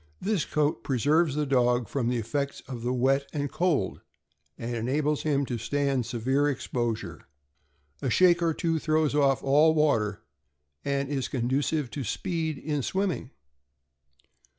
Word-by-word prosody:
This 200 -4 0
coat 150 -6 0
preserves 145 +4 +2
the 150 0 0
dog 125 -3 +2
from 125 -4 -1
the 125 - 0
effects 140 +5 -3
of 125 -3 -6
the 120 +2 -1
wet 135 +2 +2
and 145 -2 -2
cold, 175 -5 0 0.6
and 120 +1 -4
enables 145 +6 0
him 140 -2 +1
to 120 -3 -4
stand 135 +1 0
severe 130 +5 +1
exposure; 115 - -3 0.7
a 135 - -1
shake 175 +5 +4
or 165 -1 +2
two 165 -1 0
throws 155 -1 +1
off 140 -2 +2
all 150 +4 +4
water, 115 -10 +1 0.6
and 140 0 -1
it - - 0
is 130 -2 -1
conducive 135 +3 -1
to 140 - -4
speed 160 - -2
in 150 -1 -2
swimming. 190 -3 -2
140 Hz, 150 wpm, -27 LUFS, 125-150 Hz, 0.7 s, shake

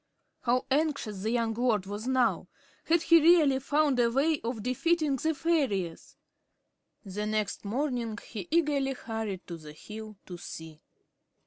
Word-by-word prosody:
How 250 +1 +1
anxious 280 -9 0
the 215 - -1
young 230 -1 +1
lord 225 -4 +1
was 205 +4 -5
now! 260 -2 +2 0.4
Had 330 0 +3
he 335 -1 +6
really 310 -5 +5
found 285 -1 +2
a 235 -1 +4
way 285 +5 +2
of 230 -2 -3
defeating 295 +3 +1
the 315 +4 0
fairies? 260 - -1 0.9
The 205 +2 -3
next 215 -1 -1
morning 235 0 -2
he 200 -6 -6
eagerly 290 -5 +2
hurried 220 -6 -5
to 170 - -7
the 155 -2 -11
hill 215 +5 -9
to 175 -2 -8
see. 160 -2 -9
240 Hz, 145 wpm, -29 LUFS, 210-290 Hz, 0.9 s, he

